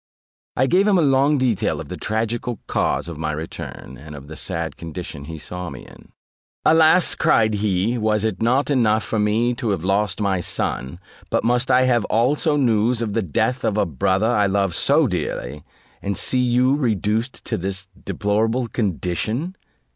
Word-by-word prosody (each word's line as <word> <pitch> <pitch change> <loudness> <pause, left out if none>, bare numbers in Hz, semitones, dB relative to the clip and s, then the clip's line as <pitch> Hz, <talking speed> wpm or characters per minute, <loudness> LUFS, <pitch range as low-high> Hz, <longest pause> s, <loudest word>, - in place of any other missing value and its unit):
I 130 - +4
gave 185 +8 +3
him 200 -3 +4
a - - +3
long 140 +1 +3
detail 125 -6 0
of - - -7
the - - -4
tragical 115 +1 -2
cause - - -1
of 85 -3 -7
my 80 -1 -1
return, 75 -4 -7
and 75 0 -10
of 70 0 -11
the 80 - -8
sad 85 -2 -4
condition 80 -3 -7
he 80 +1 -7
saw 90 +3 -6
me 70 - -10
in. - - -17 0.5
"Alas!" 160 +2 +5
cried 110 -1 +2
he, 105 +3 0
"was 105 -1 +1
it 110 0 -2
not 130 +5 +2
enough 110 -5 +2
for 110 - -2
me 110 +4 +1
to 120 -1 -3
have 95 -5 -1
lost 100 +1 0
my 100 -3 0
son, 70 -1 -3 0.3
but - - 0
must 125 +2 +1
I 125 +1 +5
have 120 -3 +2
also 145 +7 +1
news 115 -2 +2
of 105 -3 -3
the 115 - +1
death 110 - -1
of 105 - 0
a - - +2
brother 95 +7 0
I 105 -3 +2
loved 100 -2 0
so - - +3
dearly, 75 -1 -3 0.4
and 100 -2 -3
see 130 - +1
you 125 +2 +3
reduced 115 -2 -1
to - - -1
this 95 +1 -3 0.2
deplorable 110 +4 0
condition?" 110 - -2
110 Hz, 180 wpm, -21 LUFS, 95-125 Hz, 0.5 s, Alas